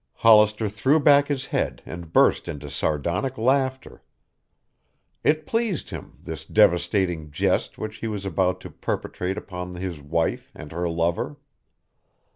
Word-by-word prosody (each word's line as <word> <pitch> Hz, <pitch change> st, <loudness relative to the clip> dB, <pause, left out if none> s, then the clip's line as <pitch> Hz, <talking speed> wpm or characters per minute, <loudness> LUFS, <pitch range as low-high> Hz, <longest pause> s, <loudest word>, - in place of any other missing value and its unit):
Hollister 105 Hz, -1 st, +5 dB
threw 130 Hz, +9 st, +2 dB
back 145 Hz, -1 st, +5 dB
his 135 Hz, -2 st, -2 dB
head -, -, -2 dB
and 85 Hz, -2 st, -8 dB
burst -, -, +4 dB
into 75 Hz, -4 st, -6 dB
sardonic 85 Hz, -, -1 dB
laughter. 130 Hz, +2 st, 0 dB, 1.2 s
It 155 Hz, 0 st, +2 dB
pleased 225 Hz, -5 st, -1 dB
him, -, -, -8 dB
this -, -, -6 dB
devastating 90 Hz, -3 st, +2 dB
jest 75 Hz, -, 0 dB
which 110 Hz, 0 st, -5 dB
he 115 Hz, -, -4 dB
was 105 Hz, -3 st, -4 dB
about 90 Hz, 0 st, 0 dB
to -, -, -9 dB
perpetrate 90 Hz, +2 st, -3 dB
upon 90 Hz, -1 st, -6 dB
his 90 Hz, -4 st, -5 dB
wife 80 Hz, +3 st, -1 dB
and 75 Hz, -, -10 dB
her 85 Hz, +1 st, -2 dB
lover. 85 Hz, -, -1 dB
95 Hz, 135 wpm, -24 LUFS, 85-130 Hz, 1.2 s, Hollister